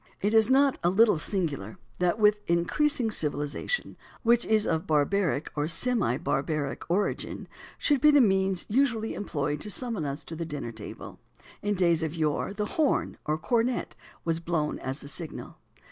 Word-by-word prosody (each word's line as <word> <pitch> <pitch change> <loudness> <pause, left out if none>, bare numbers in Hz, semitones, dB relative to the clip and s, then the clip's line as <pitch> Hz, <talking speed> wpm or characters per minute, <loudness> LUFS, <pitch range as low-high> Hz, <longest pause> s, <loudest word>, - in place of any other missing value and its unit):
It 205 +2 +1
is 220 0 +5
not 275 +1 +4
a 175 - +4
little 210 -2 +4
singular 150 - -2 0.2
that 180 -1 +2
with 210 -1 +4
increasing 225 - +1
civilisation, 150 - -1
a - - -12
gong, - - -23
which 235 0 +4
is 215 -1 +3
of 160 -1 -1
barbaric, 155 +1 +1
or 150 0 0
semi 190 - 0
barbaric 145 +1 -2
origin, 195 +4 -1 0.3
should 285 -4 +2
be 300 - +7
the 290 -1 +6
means 190 -5 +2
usually 230 -2 +1
employed 150 -6 -3
to 210 - -2
summon 230 -4 -2
us 145 +1 -4
to 165 - -7
the 165 - -4
dinner 145 -7 -5
table. - - -9 0.4
In 205 0 0
days 170 -3 +2
of 160 0 -3
yore 155 +2 0
the 210 +1 -2 0.2
horn, 295 - +1
or 155 +1 +1
cornet, 235 +8 0 0.3
was 165 -1 0
blown 165 -3 -1
as 130 +3 -3
the - - -8
signal. 160 +2 -4
175 Hz, 175 wpm, -27 LUFS, 150-220 Hz, 0.4 s, be